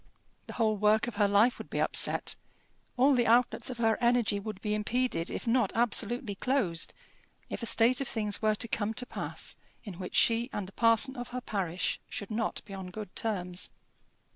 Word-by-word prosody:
The - - -7
whole 220 -2 +1
work 210 +1 +3
of 240 -4 -7
her 205 -1 +4
life 205 +5 +3
would - - -9
be - - -3
upset, - - +3 0.6
all 270 +3 +5
the 240 -2 +2
outlets 240 +3 +3
of 250 - -6
her 225 0 +1
energy 235 -4 +2
would 205 -1 -6
be 210 0 -2
impeded 210 -4 -1
if - - -5
not 235 -3 +2
absolutely 235 0 +1
closed, 195 -7 -1 0.6
if - - -4
a 230 - -2
state 240 +4 +4
of 275 - -2
things 210 -3 -1
were 215 -1 +2
to 230 - +1
come 215 0 -2
to 250 - -3
pass - - -6 0.3
in 195 -6 -9
which 180 - -6
she 235 +2 +4
and 200 -3 -4
the - - -11
parson 230 +5 +3
of 245 0 -6
her 250 +1 -5
parish 185 -6 -2
should 205 - -5
not 225 +1 -2
be 200 - -10
on 190 -1 -6
good 205 +1 -8
terms. 180 -5 -2
220 Hz, 195 wpm, -30 LUFS, 205-240 Hz, 0.6 s, all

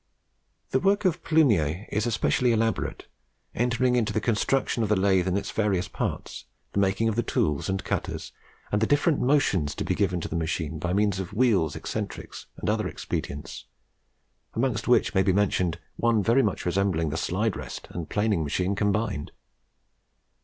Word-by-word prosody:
The 130 - +3
work 200 +4 +2
of 180 -2 +1
Plumier 105 - +2
is 105 +3 0
especially 120 +2 +2
elaborate, 115 0 -1 0.5
entering 125 +1 +1
into 120 -3 +1
the 110 - 0
construction 115 +3 0
of 110 - 0
the 105 - +4
lathe 95 -2 +2
in 95 +1 +1
its 100 0 -3
various 100 -5 0
parts, - - -4 0.3
the - - +1
making 100 +3 +2
of 110 - 0
the 120 - +2
tools 75 -7 0
and 95 0 -1
cutters, - - -3 0.4
and 105 - +1
the 110 - +3
different 145 +2 +2
motions 125 - +2
to - - -3
be - - 0
given 95 -4 0
to - - -3
the - - -5
machine 80 -1 -2
by 90 +2 -2
means 100 0 +1
of 95 0 -5
wheels, 105 - +2
eccentrics, - - -6
and - - -5
other - - +1
expedients, 70 +1 -5 0.9
amongst 115 -2 0
which 125 - +3
may 95 - +4
be 95 0 +2
mentioned 90 -4 +1 0.2
one 115 -3 +2
very 115 +5 +4
much 105 -6 -1
resembling 90 -4 +1
the - - -3
slide 95 +6 0
rest - - -7
and 85 -3 -6
planing 105 -4 +1
machine 90 +6 0
combined. 105 -4 -1
105 Hz, 175 wpm, -26 LUFS, 90-115 Hz, 0.9 s, the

